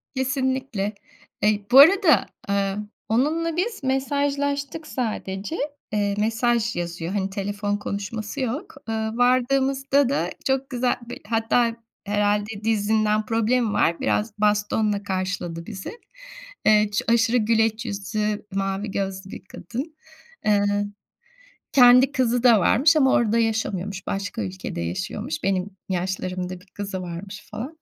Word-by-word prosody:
Kesinlikle. 260 Hz, -5 st, -1 dB, 0.5 s
Eee, 210 Hz, -1 st, +2 dB
bu 265 Hz, -, +9 dB
arada, 350 Hz, +2 st, +7 dB, 0.2 s
aaa, 200 Hz, -1 st, 0 dB, 0.3 s
onunla 315 Hz, +8 st, +1 dB
biz 410 Hz, -1 st, -2 dB
mesajlaştık 280 Hz, +2 st, -1 dB
sadece, 215 Hz, -2 st, -3 dB, 0.4 s
ııı, 205 Hz, -1 st, +1 dB
mesaj 230 Hz, +2 st, +1 dB
yazıyor. 170 Hz, 0 st, -4 dB
Hani 195 Hz, -1 st, -1 dB
telefon 205 Hz, +1 st, -2 dB
konuşması 205 Hz, +4 st, -5 dB
yok. 260 Hz, +4 st, -3 dB
Iıı, 220 Hz, 0 st, -2 dB
vardığımızda 265 Hz, +2 st, +2 dB
da 180 Hz, -11 st, 0 dB, 0.2 s
çok 265 Hz, 0 st, 0 dB
güzel 250 Hz, -1 st, +1 dB
bir -, -, -7 dB
hatta, 230 Hz, +1 st, +2 dB, 0.3 s
herhâlde 205 Hz, +1 st, 0 dB
dizinden 215 Hz, 0 st, +1 dB
problemi 225 Hz, +1 st, +1 dB
var. 170 Hz, -4 st, +2 dB
Biraz 210 Hz, +1 st, 0 dB
bastonla 210 Hz, 0 st, +1 dB
karşıladı 185 Hz, -3 st, -3 dB
bizi. 190 Hz, -2 st, -7 dB, 0.8 s
Iıı, 210 Hz, -1 st, +5 dB
ço 205 Hz, -, -1 dB
aşırı 235 Hz, +1 st, +3 dB
güleç 225 Hz, 0 st, +1 dB
yüzlü, 210 Hz, 0 st, -2 dB
mavi 195 Hz, +1 st, -2 dB
gözlü 190 Hz, 0 st, -4 dB
bir -, -, -9 dB
kadın. 255 Hz, -, -7 dB, 0.5 s
Iıı, 205 Hz, 0 st, +2 dB, 0.9 s
kendi 250 Hz, +1 st, +7 dB
kızı 245 Hz, -3 st, +1 dB
da 235 Hz, -4 st, +6 dB
varmış 295 Hz, -, +4 dB
ama 265 Hz, -3 st, +4 dB
orada 230 Hz, 0 st, +3 dB
yaşamıyormuş. 205 Hz, -4 st, -1 dB
Başka 195 Hz, -, -3 dB
ülkede 95 Hz, -3 st, -5 dB
yaşıyormuş. 90 Hz, -, -4 dB
Benim 190 Hz, 0 st, 0 dB, 0.2 s
yaşlarımda 185 Hz, 0 st, -3 dB
1 185 Hz, -, -20 dB
kızı 195 Hz, -1 st, -5 dB
varmış 185 Hz, +4 st, -8 dB
falan, 280 Hz, +8 st, -6 dB
215 Hz, 125 wpm, -24 LUFS, 200-255 Hz, 0.9 s, bu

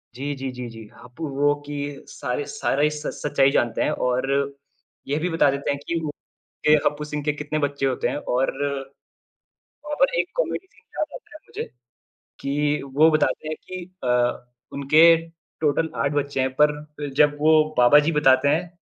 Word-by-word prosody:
जी, 140 Hz, +3 st, -3 dB
जी, 135 Hz, -1 st, -4 dB
जी, 125 Hz, -1 st, -6 dB
जी। 115 Hz, -1 st, -10 dB, 0.2 s
हप्पु 125 Hz, +6 st, -7 dB
वो 145 Hz, +1 st, +3 dB
कि 145 Hz, -1 st, -5 dB
सारे 435 Hz, -, -4 dB
सारे 150 Hz, -, 0 dB
स 150 Hz, 0 st, -6 dB
सच्चाई 140 Hz, -2 st, +3 dB
जानते 120 Hz, -4 st, +1 dB
हैं -, -, +1 dB, 0.2 s
और 125 Hz, +1 st, 0 dB, 0.8 s
ये 145 Hz, +2 st, 0 dB
भी 180 Hz, +3 st, -1 dB
बता 165 Hz, -3 st, +3 dB
देते 140 Hz, +1 st, -2 dB
हैं 140 Hz, -, -3 dB
कि 170 Hz, -, 0 dB
वु 150 Hz, -, -2 dB, 0.6 s
कि 150 Hz, -, +7 dB
हप्पु 150 Hz, 0 st, 0 dB
सिंह 150 Hz, -1 st, -4 dB
के 150 Hz, -, 0 dB
कितने 150 Hz, +1 st, -3 dB
बच्चे 140 Hz, -1 st, -1 dB
होते 130 Hz, -2 st, 0 dB
हैं -, -, -3 dB, 0.2 s
और 130 Hz, +2 st, +2 dB, 1.3 s
और 400 Hz, +13 st, +1 dB
एक -, -, 0 dB
कॉमेडी -, -, -1 dB
सीन -, -, -26 dB, 0.2 s
याद 305 Hz, -, +1 dB
आता -, -, -12 dB
है -, -, -9 dB
मुझे, -, -, -5 dB, 0.8 s
कि 145 Hz, +1 st, 0 dB
वो 155 Hz, +3 st, +6 dB
बताते 155 Hz, 0 st, 0 dB
हैं 155 Hz, -, -3 dB
कि 185 Hz, -1 st, -7 dB, 0.2 s
अ, 125 Hz, 0 st, +1 dB, 0.2 s
उनके 140 Hz, +4 st, +4 dB, 0.6 s
टोटल 155 Hz, +1 st, +1 dB
8 140 Hz, -, 0 dB
बच्चे 140 Hz, -2 st, -1 dB
हैं, 130 Hz, -, +1 dB
पर 150 Hz, 0 st, 0 dB
जब 145 Hz, 0 st, +5 dB
वो 155 Hz, +1 st, +5 dB, 0.3 s
बाबा 125 Hz, +4 st, +7 dB
जी 165 Hz, -, +2 dB
बताते 135 Hz, -2 st, +4 dB
हैं, 165 Hz, +4 st, +1 dB
145 Hz, 180 wpm, -23 LUFS, 135-155 Hz, 1.3 s, कि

